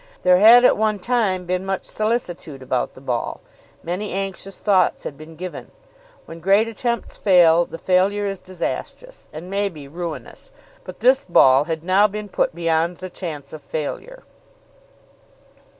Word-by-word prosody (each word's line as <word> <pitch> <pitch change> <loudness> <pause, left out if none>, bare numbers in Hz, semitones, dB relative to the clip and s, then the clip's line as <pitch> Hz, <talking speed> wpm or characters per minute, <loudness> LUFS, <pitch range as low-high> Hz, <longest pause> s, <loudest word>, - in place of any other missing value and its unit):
There 180 0 +5
had 235 +4 +8
at - - +5
one 215 -1 +1
time 200 -4 0
been 180 +1 -2
much 195 0 -3
solicitude 180 - -3
about 130 -1 -2
the 130 - -13
ball. 125 -3 -3 0.4
Many 185 +5 -4
anxious 195 0 -5
thoughts 200 -3 +2
had 140 - -6
been 155 +2 -13
given. 180 +2 -8 0.6
When 165 - -10
great 195 +6 +3
attempts 235 +1 -3
fail, 175 -3 +5
the 165 - -9
failure 190 +4 +1
is 195 -1 -3
disastrous, 345 - -6
and 160 +4 -9
may 200 +1 -1
be 150 -6 -11
ruinous. 170 - -7 0.4
But - - -10
this 260 +2 +4
ball 135 -5 +5
had 160 -1 -4
now 190 +4 +4
been 210 0 -7
put 175 - -1
beyond 165 0 0
the 185 -1 -8
chance 150 -7 -7
of 155 - -8
failure. 430 - -6
185 Hz, 155 wpm, -21 LUFS, 165-205 Hz, 0.6 s, had